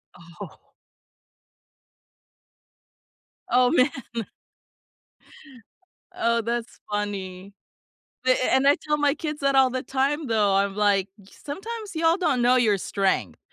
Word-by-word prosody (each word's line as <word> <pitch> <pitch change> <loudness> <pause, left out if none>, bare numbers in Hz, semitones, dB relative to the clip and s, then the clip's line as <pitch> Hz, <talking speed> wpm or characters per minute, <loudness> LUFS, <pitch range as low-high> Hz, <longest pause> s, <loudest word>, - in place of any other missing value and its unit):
Oh 170 0 -13 2.8
Oh, 250 0 +4
man. 295 -3 +4 2.3
Oh, 230 0 +1
that's 235 +1 -4
funny. 195 -2 -4 0.7
A 255 - +4
a - - +4 0.2
and 265 +1 +3
I 285 - +6
tell 300 0 -2
my 290 -1 +2
kids 300 -2 -5
that 275 0 +2
all 265 -1 +5
the 255 0 -4
time, 275 +3 -1
though. 210 -3 +2
I'm 200 0 +1
like, 200 -2 +2
"S 195 - -19
Sometimes 415 +6 -7
y'all 330 +2 +2
don't 270 -9 0
know 245 +1 +4
your 215 -5 +3
strength," 195 0 -1
250 Hz, 120 wpm, -24 LUFS, 205-285 Hz, 2.8 s, I